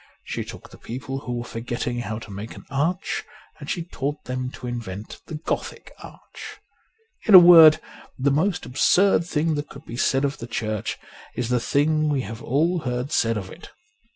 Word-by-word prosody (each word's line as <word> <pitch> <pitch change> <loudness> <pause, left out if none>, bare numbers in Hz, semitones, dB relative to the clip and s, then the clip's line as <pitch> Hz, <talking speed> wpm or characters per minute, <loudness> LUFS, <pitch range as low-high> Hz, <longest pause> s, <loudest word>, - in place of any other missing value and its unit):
She - - -4
took - - -11
the - - -14
people 135 +3 -6
who 125 -2 -5
were 120 0 -3
forgetting 120 +1 -4
how 110 -2 -4
to 110 -1 -10
make 105 +4 -7
an - - -12
arch, 160 +6 -1 0.4
and 145 - -9
she 170 - -2
taught 145 -3 -4
them 130 0 -3
to - - -9
invent 110 -4 -6
the 160 - -6
Gothic 150 - -4
arch. - - -11 0.7
In 210 - +8
a - - +15
word, 170 -3 +9 0.4
the 140 +2 +1
most 160 +5 0
absurd 170 +7 +3
thing 160 0 0
that 145 0 -4
could 140 +3 -12
be 115 - -8
said 135 +2 +2
of 140 +1 -3
the 115 - -7
Church 110 -2 -3 0.4
is 120 -1 -2
the 125 -1 +2
thing 155 +5 +1
we 140 -3 +1
have 110 -1 -7
all 165 +7 +1
heard 125 0 -3
said 115 -6 +1
of 95 -2 -6
it. - - -12
135 Hz, 190 wpm, -23 LUFS, 120-155 Hz, 0.7 s, a